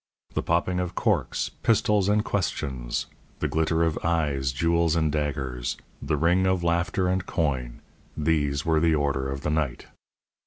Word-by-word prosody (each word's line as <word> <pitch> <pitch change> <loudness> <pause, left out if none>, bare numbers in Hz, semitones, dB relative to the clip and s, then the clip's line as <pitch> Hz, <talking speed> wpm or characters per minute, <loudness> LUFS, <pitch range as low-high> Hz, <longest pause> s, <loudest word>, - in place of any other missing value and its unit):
The - - 0
popping 90 +2 +1
of 90 -1 -3
corks, - - 0
pistols, 105 -3 +3
and 105 +1 +2
questions; 65 -10 -2 0.3
the - - -1
glitter 80 +1 +1
of 80 -2 0
eyes, 75 -6 +1
jewels 85 +3 +2
and 80 -2 +2
daggers; 65 -5 -2 0.2
the 75 +2 0
ring 90 +5 +3
of 95 -2 +1
laughter 85 +2 +1
and 95 0 +1
coin 65 -9 -2 0.4
these 75 -2 +1
were 80 -2 +3
the 80 0 +3
order 70 -2 0
of 70 0 -4
the 75 - -1
night. 75 -5 -1
80 Hz, 155 wpm, -26 LUFS, 70-85 Hz, 0.4 s, pistols